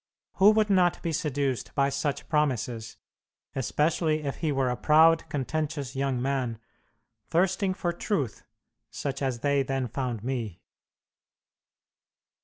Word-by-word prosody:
Who 200 +1 +7
would 215 -1 +2
not 180 -2 +3
be 170 - -1
seduced 145 -5 -2
by 140 -1 +3
such 140 +1 -2
promises, 125 -7 -1 0.6
especially 155 - +1
if 140 -2 -3
he 160 -3 -1
were 135 -2 +1
a - - -1
proud, 160 +5 +4
contentious 145 -1 -3
young 135 -2 0
man, 130 -3 -1 0.7
thirsting 185 +3 +1
for 175 -1 -1
truth, 165 - -2 0.5
such 135 -1 -4
as 130 -4 -1
they 140 -1 +2
then 135 -1 -1
found 120 -2 -3
me?" 115 -8 -4
140 Hz, 125 wpm, -27 LUFS, 130-160 Hz, 0.7 s, Who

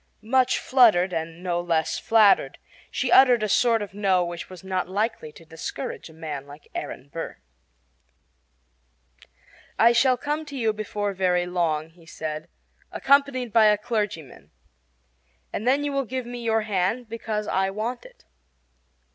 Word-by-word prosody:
Much 255 +3 +2
fluttered 210 -9 +4
and 165 +1 -4
no 175 -1 -1
less 165 -2 0
flattered, 220 -3 +4 0.3
she - - -2
uttered 250 -4 +6
a - - +1
sort 230 +1 +3
of 200 - -9
"No" 190 -3 +2
which 170 0 -7
was 185 0 -11
not 185 -1 -2
likely 205 -5 -2
to 165 - -16
discourage 160 -1 -6
a - - -15
man 150 -3 -6
like 145 +1 -14
Aaron 135 - -6
Burr. 165 - -6 2.4
"I 230 +1 +6
shall 250 +2 +3
come 295 +4 -3
to 285 -2 -8
you 225 -3 +1
before 205 -1 -3
very 180 -2 +1
long," 165 -3 -1
he 165 -1 -21
said, 155 -1 -6 0.4
"accompanied 275 -4 +2
by 225 -1 +6
a 210 -1 +5
clergyman; 205 - -4 1.0
and 220 - -3
then 275 +3 +3
you 290 - -1
will 275 -1 -1
give 255 +1 -4
me 240 0 -7
your 225 -1 +1
hand 210 +3 -1
because 220 -2 -4
I 190 0 +1
want 220 +5 -4
it." - - -17
210 Hz, 155 wpm, -25 LUFS, 175-240 Hz, 2.4 s, uttered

